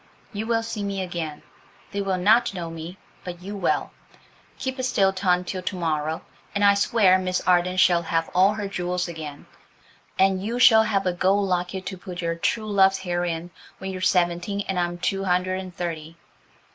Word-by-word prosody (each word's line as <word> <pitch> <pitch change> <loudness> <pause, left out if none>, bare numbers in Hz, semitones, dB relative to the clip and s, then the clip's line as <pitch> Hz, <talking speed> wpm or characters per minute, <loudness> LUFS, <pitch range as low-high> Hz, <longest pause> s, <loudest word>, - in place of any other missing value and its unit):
You 215 +2 -4
will 230 -1 +1
see 225 -2 -4
me 200 -1 -3
again. 170 -4 -5 0.5
They 200 - -2
will 195 -2 0
not 210 +3 +3
know 170 -2 -5
me, 165 +3 -8 0.3
but 175 -1 -8
you 200 +2 -6
will. 200 - 0 0.7
Keep 260 0 -4
a - - +1
still 195 -6 +2
tongue 180 -1 +1
till 185 +1 -4
to 185 +2 -3
morrow, 160 -2 -2 0.3
and 205 0 +3
I 200 - +7
swear 200 -2 +4
Miss 185 0 -1
Arden 180 0 +2
shall 175 -1 +5
have 165 0 -1
all 195 +3 +4
her 205 -2 -3
jewels 180 -2 -2
again, 155 -4 -8 0.7
and 190 0 +3
you 230 +4 -2
shall 225 -3 +7
have 205 -3 0
a 180 - +1
gold 195 +3 +2
locket 180 +1 -2
to 190 -1 -6
put 180 -1 -7
your 165 0 0
true 215 +6 -1
love's 195 -1 +4
hair 175 -2 -2
in 170 0 -4 0.3
when 190 0 -5
you're 185 -1 -6
seventeen 180 +2 +1
and 190 -2 -1
I'm 175 0 -1
two 195 +2 -1
hundred 185 +1 +1
and 185 -2 -8
thirty. 165 -2 -5
185 Hz, 195 wpm, -24 LUFS, 175-200 Hz, 0.7 s, I